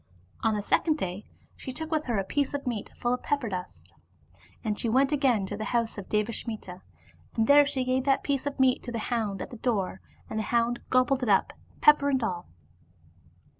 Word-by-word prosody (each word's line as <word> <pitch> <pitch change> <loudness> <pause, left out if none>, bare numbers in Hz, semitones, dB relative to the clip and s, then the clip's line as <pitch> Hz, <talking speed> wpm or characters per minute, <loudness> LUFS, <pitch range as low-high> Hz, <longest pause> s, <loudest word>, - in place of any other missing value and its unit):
On 220 -1 +2
the 205 - -2
second 310 +8 +2
day 190 -3 -4 0.3
she 260 - -7
took 320 +5 -6
with 310 -1 0
her 235 -4 0
a 195 - +1
piece 285 +8 -1
of 280 - -4
meat 235 -5 -3
full 240 0 0
of 250 - -2
pepper 280 -6 -1
dust, 95 - -7 0.7
and 210 -1 -2
went 265 +5 +3
again 260 -9 +2
to 205 - -5
the 215 +1 -4
house 230 +1 0
of 200 - -8
Devasmita, 210 -3 -3 0.5
and 225 - +2
there 285 +3 +7
she 265 -2 -1
gave 255 0 +1
that 275 -1 +2
piece 280 -1 -1
of 280 -1 -4
meat 260 -1 +4
to 245 - -6
the 235 - -3 0.2
hound 215 -4 -1
at - - -10
the 240 - -8
door, 205 -6 -1 0.3
and 220 - -3
the 215 - -3
hound 235 0 +1
gobbled 255 +1 +3
it 245 - -1
up, 195 - +3 0.3
pepper 295 -1 +6
and 265 -3 +1
all. 180 -5 -3
240 Hz, 205 wpm, -28 LUFS, 210-270 Hz, 0.7 s, there